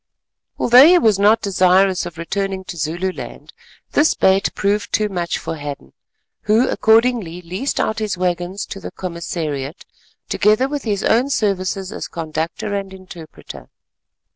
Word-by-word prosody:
Although 250 +4 +7
he 355 +1 +6
was 220 - +3
not 215 +3 +4
desirous 185 -1 +3
of 170 -2 -11
returning 190 +3 -3
to 185 - -8
Zululand, 170 +4 -5 0.4
this 300 +2 +3
bait 190 +1 +3
proved 205 +1 -1
too 215 -1 +1
much 175 -3 -2
for 165 - -5
Hadden, 145 - -8 0.6
who 225 +4 +4
accordingly 220 -6 +2
leased 185 +11 -3
out 220 - -1
his 210 -4 -2
waggons 180 +2 -2
to 195 - -8
the - - -7
Commissariat, 165 -4 -5 0.4
together 215 +5 +2
with 285 -1 -5
his 205 -3 -1
own 245 +5 +2
services 195 -5 -1
as - - -6
conductor 165 +4 -4
and 195 -1 -3
interpreter. 170 - -12
190 Hz, 140 wpm, -19 LUFS, 170-215 Hz, 0.6 s, Although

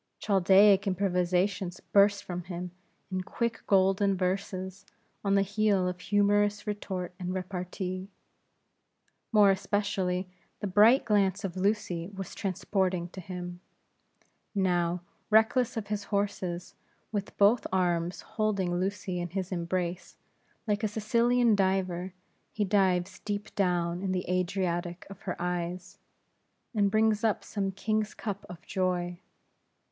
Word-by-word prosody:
Chaldaic 195 0 +5
improvisations 185 0 0
burst 200 0 +3
from 180 -1 -5
him, 180 0 -5 0.4
in 185 0 -1
quick 235 +5 -2
Golden 195 0 +3
Verses, 190 0 -2 0.4
on 200 -1 +2
the 195 - +4
heel 200 -2 +1
of 180 0 -3
humorous 205 +1 +2
retort 190 -4 -4
and 180 0 -3
repartee. 185 0 -4 1.2
More 210 -3 +6
especially, 190 -2 -1 0.3
the - - -3
bright 210 +7 +5
glance 200 -2 +2
of 190 -2 -3
Lucy 185 -3 -1
was 195 -1 -6
transporting 185 -2 -1
to 185 - -9
him. 180 0 -6 1.0
Now, 175 -2 +1 0.3
reckless 225 +3 +3
of 220 - -2
his 205 -1 -2
horses, 190 -4 -2 0.4
with 205 -2 -4
both 210 +4 +4
arms 175 -1 0
holding 200 -5 -1
Lucy 185 -1 -2
in 175 - -4
his 190 +1 -4
embrace, 175 0 -3 0.5
like 210 +1 0
a - - +3
Sicilian 235 +2 +3
diver 190 -2 0 0.4
he 210 - -1
dives 185 -2 +1
deep 205 0 -4
down 175 -2 0
in 190 -1 -1
the 180 -1 -2
Adriatic 180 -1 -1
of 195 - -11
her 180 - -3
eyes, 180 +2 -3 0.7
and 205 -3 +3
brings 215 +1 +2
up 220 -2 +1
some 195 -2 -2
king's 215 +2 -1
cup 200 -2 -5
of 175 0 -10
joy. 180 -2 -1
190 Hz, 125 wpm, -29 LUFS, 180-205 Hz, 1.2 s, More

